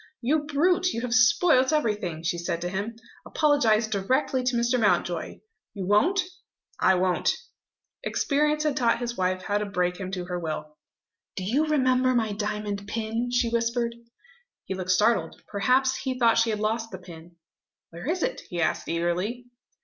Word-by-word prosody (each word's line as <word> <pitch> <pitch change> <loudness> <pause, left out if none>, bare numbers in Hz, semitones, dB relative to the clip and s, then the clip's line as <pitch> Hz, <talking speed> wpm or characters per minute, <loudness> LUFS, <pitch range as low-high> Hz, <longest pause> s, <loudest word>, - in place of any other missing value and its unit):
"You 290 +5 0
brute, 350 +5 +2
you 230 - -3
have 245 -1 -2
spoilt 255 +3 +4
everything!" 210 - -1
she 170 0 -1
said 170 0 -2
to 175 - -2
him. 200 +5 -4 0.3
"Apologise 245 -8 +2
directly 255 +6 0
to 250 -1 +1
Mr. 235 +1 +1
Mountjoy. 215 - 0 0.3
You 195 -2 -4
won't?" 330 - +3 0.6
"I 190 - +4
won't!" 180 0 +1 0.7
Experience 300 +2 +1
had 300 -3 0
taught 235 -3 +2
his 240 0 -4
wife 185 -1 -1
how 205 +1 0
to 210 - -2
break 180 -2 -1
him 190 -2 -5
to 180 -2 -3
her 180 0 -3
will. 155 -2 -5 0.6
"Do 190 - -4
you 270 +11 +1
remember 255 -3 +2
my 220 -3 +1
diamond 205 -1 -3
pin?" 225 +2 -2
she 245 -1 +1
whispered. 235 0 0 0.7
He - - -3
looked 185 -1 -5
startled. 215 +5 +2
Perhaps 260 +5 +2
he 260 -1 -3
thought 230 -2 +4
she 230 0 +2
had 215 -1 -1
lost 225 +1 -1
the 190 - -7
pin. 170 -2 -13 0.6
"Where 170 - -6
is 360 +1 0
it?" - - -2
he 175 - -4
asked 160 - 0
eagerly. 180 +9 -1
225 Hz, 170 wpm, -26 LUFS, 185-255 Hz, 0.7 s, spoilt